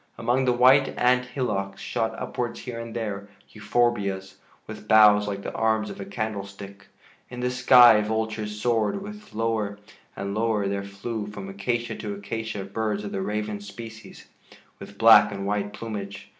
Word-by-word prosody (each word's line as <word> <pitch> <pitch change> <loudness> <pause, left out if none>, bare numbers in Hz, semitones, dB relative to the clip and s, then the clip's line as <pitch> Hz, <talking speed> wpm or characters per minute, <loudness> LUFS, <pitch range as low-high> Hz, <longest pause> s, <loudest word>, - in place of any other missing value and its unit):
Among 130 +2 +1
the 125 - +3
white 130 +3 +4
ant 125 0 +3
hillocks 105 -7 -3
shot 115 -2 -2
upwards 125 -1 -4
here 120 -2 -6
and 115 0 -7
there 100 -3 -4 0.2
euphorbias, 105 -4 -1 0.3
with - - -10
boughs 105 -1 +6
like 100 -1 -4
the - - -5
arms 110 -1 0
of - - -9
a - - -5
candle 105 0 -3
stick. 100 0 -12 0.4
In 125 - -8
the 125 0 0
sky 125 -3 +7
vultures 110 -1 -3
soared, 110 -2 +1
and 210 +1 -9 1.0
lower 110 -2 0
there 100 0 -2
flew 105 +2 -5
from 100 -2 -8
acacia 120 +5 -2
to 105 -2 -5
acacia 105 0 -5
birds 105 +1 -3
of 105 - -6
the 95 - -3
raven 105 +1 -3
species 110 +2 -11 0.5
with 100 - -11
black 110 -1 +7
and 100 -1 -5
white 105 0 -1
plumage. 100 -3 -7
110 Hz, 155 wpm, -25 LUFS, 100-120 Hz, 1.0 s, sky